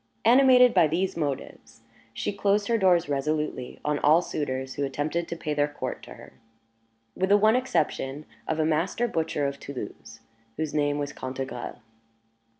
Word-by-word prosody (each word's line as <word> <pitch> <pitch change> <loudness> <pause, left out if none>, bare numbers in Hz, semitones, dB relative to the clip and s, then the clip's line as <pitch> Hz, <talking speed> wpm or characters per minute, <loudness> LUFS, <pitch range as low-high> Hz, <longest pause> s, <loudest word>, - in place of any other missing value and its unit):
Animated 250 0 +7
by 160 - +5
these 185 +5 -1
motives, 145 -6 -5 0.3
she 115 - -3
closed 200 +1 +1
her 230 - +3
doors 180 -5 +4
resolutely 145 -2 -2
on 150 -1 0
all 160 +4 +5
suitors 130 -4 -3
who 145 - -3
attempted 150 +5 -2
to - - -4
pay 155 -2 -3
their 145 0 +2
court 145 - -5
to - - -11
her, - - -14 0.8
with 190 +1 0
the 205 - +7
one 215 +2 +4
exception 150 - -1 0.2
of 160 - -1
a 155 - +1
master 165 +9 0
butcher 160 -7 -1
of 140 0 -3
Toulouse, 115 -3 -8 0.4
whose 155 -1 -3
name 145 -1 +1
was 145 -1 -3
Cantegrel. 130 -3 -6
155 Hz, 160 wpm, -26 LUFS, 140-190 Hz, 0.8 s, Animated